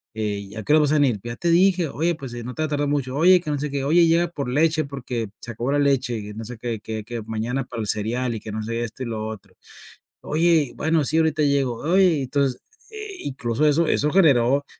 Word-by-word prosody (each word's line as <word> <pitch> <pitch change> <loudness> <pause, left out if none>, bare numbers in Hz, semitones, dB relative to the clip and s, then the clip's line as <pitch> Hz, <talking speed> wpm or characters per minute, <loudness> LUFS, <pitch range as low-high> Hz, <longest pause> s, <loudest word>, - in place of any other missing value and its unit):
eh, 105 -2 -3
¿y 105 - -9
a 110 - -5
qué 150 - +2
hora 155 - +6
vas 145 - +2
a - - +3
venir?". 135 -8 +2
"Ya 120 0 -5
te 170 - -1
dije" 180 -1 +3
"Oye, 165 +5 0
pues, 135 -6 -8
eh, 120 - -6
no 125 +1 -6
te 155 - -4
vayas 155 - -2
a 145 - 0
tardar 145 0 0
mucho, 135 -2 -1
oye, 180 +4 +5
que 155 - -6
no 145 - -1
sé 150 -1 -3
qué, 140 -1 -2
oye, 170 +4 +5
llega 170 +1 +3
por 145 -6 -5
leche 155 +3 +2
porque 125 -5 -5
se 120 - -7
acabó 120 +4 -3
la 145 - +2
leche 135 -4 +1
y 105 0 -8
no 110 +1 -7
sé 125 +1 -8
que 115 -1 -4
que 110 -1 -5
que 120 0 -6
mañana 115 +4 -3
para 115 -2 -6
el 105 - -4
cereal 115 +4 -1
y 110 - -4
que 110 - -7
no 110 +1 -4
sé 115 +2 -3
esto 115 +3 -6
y - - -4
lo 110 -2 -4
otro". 100 -3 -9 0.7
"Oye, 160 -3 +2
bueno, 160 0 +1
sí, 160 - +2
ahorita 155 -1 +2
llego". 135 -4 +1
"Oye", 175 -3 +3
entonces, 135 -1 -1 0.3
eh, 425 -3 -7
incluso 130 0 -2
eso 160 +2 +3
eso 150 +1 +1
generó, 140 -6 +4
135 Hz, 260 wpm, -23 LUFS, 115-155 Hz, 0.7 s, hora